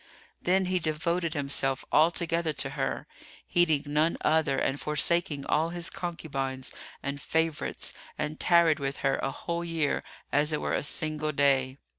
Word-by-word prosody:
[FN#306] - - -29
Then 190 +1 +3
he 185 0 +1
devoted 165 +1 -1
himself 140 -2 -1
altogether 165 0 +2
to - - -1
her, - - -2 0.4
heeding 160 -5 +3
none 150 +3 +1
other 155 -3 +2
and 135 +1 0
forsaking 150 -1 +1
all 160 +2 +2
his 175 0 -3
concubines 135 -6 -4 0.3
and 140 0 -3
favourites, 160 0 -1 0.2
and 155 +1 -3
tarried 170 -3 +4
with 140 0 -3
her 135 0 +3
a - - -1
whole 170 +5 -3
year 165 -4 0 0.3
as 150 +2 +4
it 150 - 0
were - - -2
a - - +1
single 155 +1 -1
day. 135 -2 +2
155 Hz, 155 wpm, -28 LUFS, 140-170 Hz, 0.4 s, tarried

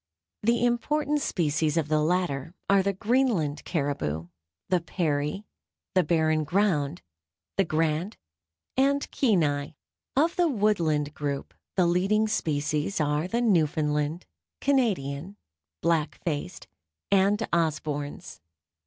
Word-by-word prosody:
The 235 +2 +2
important 295 +5 +1
species 155 - 0
of 160 -3 +1
the 155 0 +2
latter 165 -1 -1
are 200 0 +5
the 200 +1 +1
Greenland 210 - +1
caribou, 140 - -2 0.4
the 180 -2 +2
Peary, 155 +2 -1 0.5
the 185 - +4
Barren 155 -1 +2
Ground, 170 -3 0 0.5
the 195 - +3
Grant 160 +5 0 0.6
and 280 +2 +2
Kenai. 155 - +1 0.4
Of 320 +5 +2
the 350 -1 +4
Woodland 170 - +1
group 140 -2 -4 0.2
the 185 -2 +4
leading 195 +5 +2
species 150 -3 -1
are 150 +2 +1
the 235 +5 0
Newfoundland, 155 -5 +1 0.3
Canadian, 195 - 0 0.5
Black 165 -2 +1
Faced, 145 - -3 0.4
and 200 +3 +3
Osborn's. 150 - -2
170 Hz, 110 wpm, -27 LUFS, 150-210 Hz, 0.6 s, are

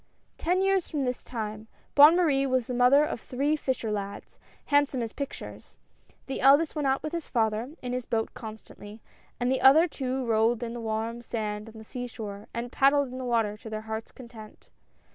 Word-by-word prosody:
Ten 365 +3 +1
years 390 -2 +1
from 285 -4 -1
this 250 0 -3
time 215 -2 -5 0.3
Bonne 295 +3 +8
Marie 285 -6 +2
was 255 -2 +1
the 250 - -4
mother 250 +4 +5
of 240 - -5
three 280 +4 0
fisher 260 -6 -2
lads, 200 -1 -6 0.3
handsome 285 -4 +2
as 225 - -6
pictures. 280 -1 -8 0.5
The 270 - -4
eldest 285 +4 +5
went 295 -2 0
out 265 0 +1
with 305 - -3
his 335 -2 -4
father 225 +4 -1
in 250 0 -3
his 250 -1 -3
boat 225 -2 -2
constantly, 215 -1 -10 0.4
and 245 +1 +1
the 265 - 0
other 310 +6 +7
two 265 -4 -3
rolled 225 +1 +2
in 230 -1 -4
the 240 - -6
warm 225 +1 -3
sand 215 -2 -4
on 225 - -13
the 220 - -10
sea 245 +3 -6
shore, 210 -4 -8
and 235 +1 -5
paddled 275 0 +3
in 255 +1 -7
the - - -4
water 225 -4 +1
to 220 - -10
their 215 0 -4
hearts' 220 0 -6
content. 230 -4 -13
245 Hz, 200 wpm, -27 LUFS, 220-275 Hz, 0.5 s, Bonne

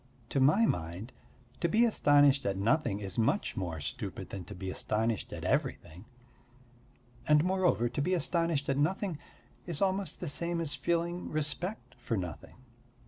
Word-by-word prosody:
To 140 - 0
my 155 +13 +5
mind 90 - -2 0.5
to 170 - +1
be 225 +6 +4
astonished 145 - +4
at 95 -1 0
nothing 105 0 +1
is 100 +1 -4
much 115 - +1
more 85 -5 -3
stupid 75 0 -5
than 95 -2 -5
to - - -9
be 95 +1 -5
astonished 110 +3 -1
at - - -6
everything. 90 +7 -2 1.2
And, 150 0 +5
moreover, 185 -10 +2
to 120 +4 -2
be 185 +6 +1
astonished 165 -4 0
at 135 - +1
nothing 175 +1 0 0.5
is 170 -4 -2
almost 195 0 0
the 175 - -4
same 170 +3 -1
as 160 -3 -2
feeling 170 +2 -1
respect 155 - -2
for 120 -2 -2
nothing. 90 -5 -6
145 Hz, 155 wpm, -31 LUFS, 105-175 Hz, 1.2 s, my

